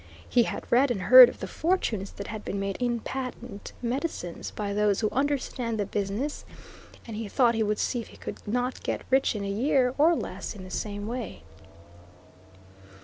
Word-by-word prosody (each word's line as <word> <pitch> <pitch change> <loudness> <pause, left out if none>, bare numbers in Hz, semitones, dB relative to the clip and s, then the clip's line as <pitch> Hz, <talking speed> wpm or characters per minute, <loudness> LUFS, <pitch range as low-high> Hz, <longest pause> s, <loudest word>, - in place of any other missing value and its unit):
He 240 -2 +3
had - - -5
read 265 +3 +5
and 240 -5 -1
heard 250 +6 +10
of - - -11
the - - -3
fortunes 235 - -1
that 200 - -7
had 215 0 -6
been 200 - -3
made 195 -1 -2
in 240 -2 0
patent 250 -5 -6
medicines, 245 - -3
by 205 -1 -4
those 210 0 +2
who 215 - +2
understand 255 -4 -1
the 205 - +1
business, 205 +9 -3 0.6
and 225 - -7
he 220 0 -4
thought 240 +2 +3
he 225 - 0
would 210 -1 +1
see 240 - -1
if - - -10
he - - -15
could - - -7
not 245 +4 -1
get - - -3
rich 265 -3 +3
in 205 - -3
a - - -3
year 250 +5 +2
or 330 +3 +6
less 195 - -5
in 190 - -9
the 185 - -10
same 205 0 -4
way. 230 - -5
230 Hz, 195 wpm, -27 LUFS, 205-255 Hz, 0.6 s, heard